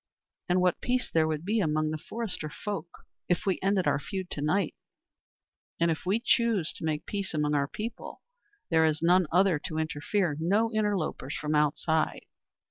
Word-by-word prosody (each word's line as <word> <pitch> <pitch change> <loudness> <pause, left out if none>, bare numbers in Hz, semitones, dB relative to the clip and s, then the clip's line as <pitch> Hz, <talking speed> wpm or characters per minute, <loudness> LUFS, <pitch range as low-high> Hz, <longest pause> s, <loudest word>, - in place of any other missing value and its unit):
And 180 +1 +3
what 180 -1 +2
peace 250 0 0
there 160 -1 +3
would 155 +1 -2
be 220 +3 +1
among 155 -4 +1
the 155 - -2
forester 195 -6 -4
folk 195 +1 -5 0.4
if 175 - +1
we 190 -2 +1
ended 195 -1 +2
our 140 -1 +2
feud 190 +3 -5
to 145 - -3
night. 165 +4 +1 1.1
And 170 0 +3
if 160 +2 -4
we 200 +4 +2
choose 230 -8 +2
to - - -9
make 155 0 -1
peace 200 -5 -4
among 150 -1 +1
our 140 -1 +2
people 225 +9 -7 0.5
there 160 -1 +5
is 155 +1 -1
none 180 0 +5
other 180 -2 +4
to 155 +1 -5
interfere, 160 +2 0
no 210 +7 +2
interlopers 200 -10 -1
from 150 0 -2
outside 155 +1 +1
170 Hz, 175 wpm, -29 LUFS, 155-200 Hz, 1.1 s, there